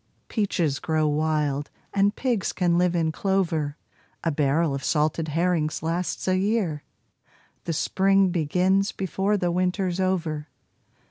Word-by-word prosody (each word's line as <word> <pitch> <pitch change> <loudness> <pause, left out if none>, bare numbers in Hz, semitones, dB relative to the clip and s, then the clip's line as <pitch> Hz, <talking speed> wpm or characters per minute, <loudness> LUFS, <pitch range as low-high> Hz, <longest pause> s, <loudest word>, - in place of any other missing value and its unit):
Peaches 175 - 0
grow 155 -1 +1
wild, 150 -1 0 0.2
and 200 +1 +2
pigs 240 -7 -1
can 175 -2 +1
live 180 -1 +2
in 165 -2 +1
clover; 165 -5 0 0.5
A 165 - +1
barrel 150 +1 +1
of 135 - -4
salted 155 +1 +1
herrings 160 -1 0
lasts 170 +4 -2
a 185 - +3
year; 195 -7 0 0.8
The 170 - -1
spring 195 +4 +3
begins 180 +4 +1
before 195 +2 -1
the 180 -2 0
winter's 180 +1 0
over. 165 -5 -1
170 Hz, 130 wpm, -25 LUFS, 155-190 Hz, 0.8 s, a